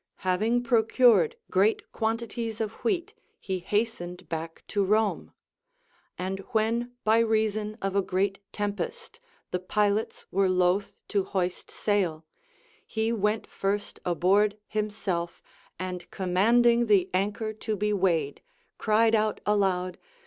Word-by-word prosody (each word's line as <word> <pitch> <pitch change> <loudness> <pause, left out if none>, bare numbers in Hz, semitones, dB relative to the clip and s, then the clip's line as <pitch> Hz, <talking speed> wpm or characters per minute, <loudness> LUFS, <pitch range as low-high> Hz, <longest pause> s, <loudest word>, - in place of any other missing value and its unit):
Having 220 +7 +2
procured 230 - +4 0.2
great 200 +4 +2
quantities 225 0 -2
of 220 -2 -1
wheat, 390 0 0 0.3
he 190 -2 -3
hastened 185 -3 -2
back 165 0 -5
to 205 -1 +1
Rome; 215 +2 +1 0.9
and 190 +1 -3
Avhen 230 +3 0
by 220 +1 +4
reason 215 -1 +1
of 195 0 -1
a 200 - +4
great 195 +1 -1
tempest 210 - -4 0.3
the 180 - 0
pilots 205 +3 0
Λvere 195 0 +3
loath 185 +3 +2
to 200 -2 +1
hoist 185 -2 -2
sail, 180 -7 -1 0.6
he 220 0 -1
went 210 0 0
first 205 +1 -3
aboard 195 +4 +2
himself, 205 -5 -2 0.4
and 180 -1 -5
commanding 235 +6 +3
the 195 -4 +4
anchor 205 +3 -1
to 215 0 -3
be 210 +1 0
weighed, 170 -7 +1 0.4
cried 225 +1 +3
out 215 -1 +2
aloud. 190 -3 +1
205 Hz, 120 wpm, -27 LUFS, 185-220 Hz, 0.9 s, procured